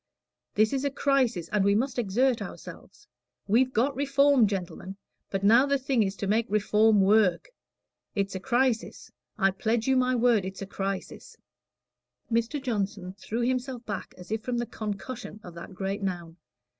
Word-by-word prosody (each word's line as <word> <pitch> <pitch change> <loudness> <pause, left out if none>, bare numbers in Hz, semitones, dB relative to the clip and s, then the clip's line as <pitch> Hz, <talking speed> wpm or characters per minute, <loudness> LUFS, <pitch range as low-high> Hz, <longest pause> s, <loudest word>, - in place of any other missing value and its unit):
This 215 +3 +3
is 270 0 -1
a 285 - +1
crisis, 260 - +1
and 210 -2 +1
we 200 +1 +3
must 255 +3 0
exert 240 +4 +1
ourselves. 415 - -10 0.4
We've 250 +5 +3
got 260 +4 +1
Reform, 275 -3 +4
gentlemen, 190 0 -5 0.3
but 195 0 -3
now 235 +7 +6
the 280 0 +2
thing 265 -3 0
is 195 -1 0
to 200 - -4
make 220 +3 +1
Reform 210 0 +3
work. 205 - +3 0.7
It's 200 -1 -1
a 190 - -3
crisis 240 +2 -1 0.3
I 195 -2 +3
pledge 220 +4 -1
you 265 - +3
my 255 0 +2
word 235 -4 +3
it's 190 +1 -6
a - - -5
crisis." 195 0 -5 0.9
Mr. 230 +5 0
Johnson 200 -7 -3
threw 230 +4 -3
himself 250 0 -2
back 205 - -6
as 180 +2 -12
if 220 0 -1
from 245 +1 -3
the 240 - -1
concussion 215 +1 -6
of 175 - -10
that 170 +3 -10
great 195 +2 -3
noun. 175 -3 -4
220 Hz, 170 wpm, -27 LUFS, 195-255 Hz, 0.9 s, now